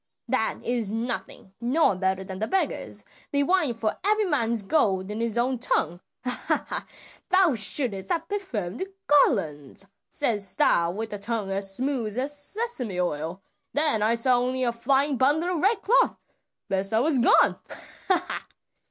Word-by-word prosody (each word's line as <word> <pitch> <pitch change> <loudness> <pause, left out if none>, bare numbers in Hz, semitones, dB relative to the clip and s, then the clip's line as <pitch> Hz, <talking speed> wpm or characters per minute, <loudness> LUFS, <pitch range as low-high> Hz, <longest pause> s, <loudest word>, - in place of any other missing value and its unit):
"Pooh! - - -11
that - - +1
is 235 -4 -1
nothing; 225 -4 -4
no 270 +7 +3
one 185 - -2
better 190 0 0
than 190 0 -7
the 220 - -1
beggars, 385 - -2 0.3
they 285 0 +2
whine 355 -4 +2
for 220 -1 -2
every 425 +1 +2
man's 235 - +1
gold 195 -6 +1
in 215 +2 -3
his 230 -1 -1
own 250 +1 +1
tongue. 175 -7 0 0.2
Ha, 250 -1 -1
ha! - - -3 0.4
'Thou 370 -4 +4
shouldst 210 -3 +1
have 330 -1 -1
perfumed 245 - -3 0.2
garlands,' 195 - +2 0.2
saidst 215 -9 -1
thou 170 0 +4
with 220 +5 -4
tongue 210 -2 -2
as 195 0 0
smooth 250 -4 -1
as 275 +3 -1
Sesame 290 - -2
oil; 170 +2 -2 0.3
then 295 -8 +3
I 220 +2 +3
saw 245 +1 +3
only 255 +1 -1
a 240 - +2
flying 270 +4 +1
bundle 310 +8 +2
of 315 - -2
red 410 +3 +2
cloth. 480 +5 +3 0.5
Besa 195 +3 +1
was 275 +1 +2
gone. 235 - +4
Ha, 360 -2 -3
ha!" - - -4
235 Hz, 160 wpm, -26 LUFS, 200-290 Hz, 0.5 s, Thou